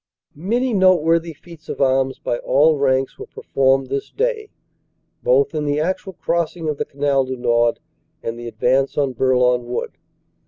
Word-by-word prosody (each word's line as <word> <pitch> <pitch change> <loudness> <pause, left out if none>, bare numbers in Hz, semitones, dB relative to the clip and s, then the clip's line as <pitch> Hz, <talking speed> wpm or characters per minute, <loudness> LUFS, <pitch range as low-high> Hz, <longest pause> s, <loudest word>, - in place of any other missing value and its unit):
Many 235 - -1
noteworthy 170 -4 +3
feats 165 0 -15
of - - -5
arms 135 -1 +1
by 120 - -3
all 150 +4 +3
ranks 135 -1 0
were - - -8
per - - -12
formed 135 -1 +2
this 135 0 -3
day, 450 -2 -2 0.7
both 485 -3 +2
in 155 - -2
the 145 0 0
actual 185 +4 -2
crossing 170 -1 -2
of 150 -2 -2
the - - -1
Canal 140 -1 0
du 130 0 -4
Nord 120 -1 +1 0.4
and 115 - -3
the 120 - -7
advance 125 +4 0
on 140 -3 +1
Bourlon 125 -1 +2
Wood. 125 - -3
140 Hz, 165 wpm, -20 LUFS, 130-170 Hz, 0.7 s, noteworthy